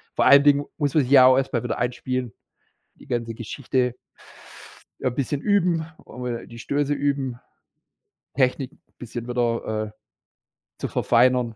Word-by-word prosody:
vor -, -, +2 dB
allen 140 Hz, 0 st, +8 dB
Dingen 145 Hz, 0 st, +4 dB
muss 145 Hz, -3 st, 0 dB
man 150 Hz, -, +5 dB
sich 130 Hz, -, -5 dB
ja 130 Hz, -2 st, +8 dB
auch 130 Hz, 0 st, +6 dB
erstmal 130 Hz, -3 st, -1 dB
wieder -, -, -2 dB
einspielen, 125 Hz, 0 st, -2 dB, 0.6 s
die -, -, -17 dB
ganze 115 Hz, -1 st, -2 dB
Geschichte 125 Hz, +2 st, -2 dB, 1.0 s
ein 125 Hz, -, -1 dB
bisschen 140 Hz, +2 st, -2 dB
üben, 180 Hz, -4 st, +1 dB, 0.2 s
und 125 Hz, -, -9 dB
wieder 120 Hz, -1 st, -4 dB
die 115 Hz, -, -12 dB
Stöße 145 Hz, +4 st, -1 dB
üben, 140 Hz, -3 st, -2 dB, 0.9 s
Techniken 130 Hz, 0 st, 0 dB, 0.2 s
bisschen 120 Hz, 0 st, -7 dB
wieder, 115 Hz, -3 st, -1 dB
äh, -, -, -12 dB, 0.9 s
zu -, -, -3 dB
verfeinern 125 Hz, -1 st, +2 dB
125 Hz, 145 wpm, -23 LUFS, 120-140 Hz, 1.0 s, allen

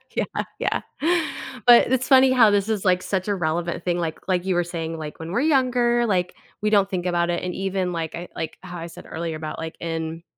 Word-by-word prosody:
Yeah, -, -, -1 dB, 0.2 s
yeah. -, -, 0 dB, 0.9 s
But, 240 Hz, +1 st, +7 dB
it's 260 Hz, 0 st, +1 dB
funny 265 Hz, -1 st, +6 dB
how 235 Hz, -4 st, +6 dB
this 205 Hz, +1 st, +1 dB
is, 210 Hz, -2 st, -1 dB
like, 180 Hz, 0 st, +3 dB
such 190 Hz, 0 st, -2 dB
a 205 Hz, -, +1 dB
relevant 170 Hz, 0 st, -2 dB
thing, 175 Hz, -1 st, 0 dB
like 160 Hz, -2 st, -2 dB
like, 180 Hz, 0 st, +1 dB
you 185 Hz, -2 st, +1 dB
were 175 Hz, -, +2 dB
saying, 165 Hz, -1 st, -4 dB
like, 155 Hz, -1 st, -7 dB
when 160 Hz, +2 st, -6 dB
we're 240 Hz, -, +1 dB
younger, 250 Hz, -5 st, +2 dB
like, 180 Hz, -4 st, 0 dB, 0.3 s
we 210 Hz, -, +1 dB
don't 200 Hz, -2 st, +3 dB
think 185 Hz, -2 st, -3 dB
about 175 Hz, -1 st, +1 dB
it 175 Hz, -, -1 dB
and 180 Hz, -1 st, -3 dB
even, 190 Hz, -1 st, -1 dB
like, 165 Hz, -2 st, -3 dB
I 175 Hz, +1 st, -7 dB
like, 160 Hz, -, -5 dB
how 180 Hz, -2 st, -8 dB
I 165 Hz, 0 st, -6 dB
said -, -, -12 dB
earlier 165 Hz, 0 st, -4 dB
about, 155 Hz, 0 st, -6 dB
like, 160 Hz, 0 st, -5 dB
in 165 Hz, 0 st, -4 dB
180 Hz, 230 wpm, -23 LUFS, 165-210 Hz, 0.9 s, But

